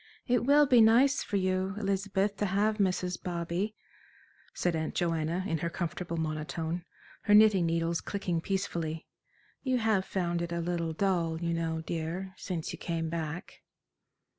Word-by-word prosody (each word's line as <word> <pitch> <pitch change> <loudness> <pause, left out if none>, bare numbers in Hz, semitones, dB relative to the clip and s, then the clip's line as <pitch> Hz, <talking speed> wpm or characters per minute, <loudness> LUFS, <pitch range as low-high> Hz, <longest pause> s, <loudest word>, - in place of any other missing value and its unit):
"It 245 -1 +2
will 290 +2 +6
be 250 -4 +6
nice 250 +6 +5
for 200 - -1
you, 185 0 0
Elizabeth, 200 0 0
to 205 - 0
have 210 +3 +1
Mrs. 180 -2 0
Bobby," 175 +4 -2 0.8
said 175 -2 -1
Aunt 160 0 -3
Joanna, 165 +1 0
in 165 -5 -1
her 170 - -1
comfortable 170 0 -4
monotone, 160 +2 -3 0.4
her 205 - +6
knitting 210 -5 +6
needles 165 0 0
clicking 180 -5 -2
peacefully. 165 -4 -2 0.6
"You 260 -2 +1
have 220 -5 +2
found 175 -3 -1
it 170 0 -3
a 170 - -1
little 170 -1 -1
dull, 170 -3 0
you 170 0 -1
know, 165 -1 -1
dear, 170 +4 -4
since 175 -5 -4
you - - -8
came 165 -1 -2
back." 165 +2 -5
175 Hz, 155 wpm, -30 LUFS, 165-200 Hz, 0.8 s, will